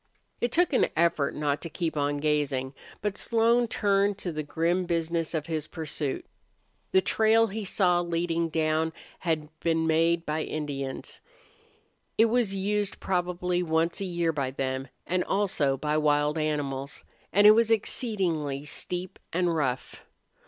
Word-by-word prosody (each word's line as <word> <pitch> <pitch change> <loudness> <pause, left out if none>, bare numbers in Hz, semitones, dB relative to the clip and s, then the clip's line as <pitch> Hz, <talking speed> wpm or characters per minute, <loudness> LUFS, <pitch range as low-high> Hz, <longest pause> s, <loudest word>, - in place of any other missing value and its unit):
It 240 - 0
took 345 +1 +2
an - - +4
effort 160 -3 +2
not 145 -1 -1
to 165 - -5
keep 160 +1 -3
on 145 0 0
gazing. 145 -3 0 0.3
But 205 -1 -1
Slone 235 +1 +3
turned 200 -2 +1
to 185 -4 -4
the 155 -1 -3
grim 170 +4 0
business 165 -1 -1
of 155 -2 -2
his 155 -2 -3
pursuit. 150 -3 -3 0.7
The 190 - +5
trail 225 +3 +4
he 215 0 -4
saw 180 -2 +3
leading 170 -1 -1
down 160 0 0 0.3
had 160 -3 -1
been 165 -1 +1
made 165 +1 +2
by 155 +1 -1
Indians. 140 -4 -5 1.0
It 225 - +6
was 230 -4 +1
used 205 +1 -1
probably 180 -1 -1
once 165 +1 0
a - - -1
year 170 -2 0
by 140 -3 -1
them; 130 0 -3 0.2
and 180 0 0
also 180 -9 +1
by 150 +2 0
wild 150 0 +2
animals, 140 -3 -2 0.3
and 205 +2 +4
it 210 - +11
was 225 +1 +4
exceedingly 180 - 0
steep 180 +4 -3
and 175 0 +1
rough. 130 -5 -2
165 Hz, 150 wpm, -27 LUFS, 150-190 Hz, 1.0 s, it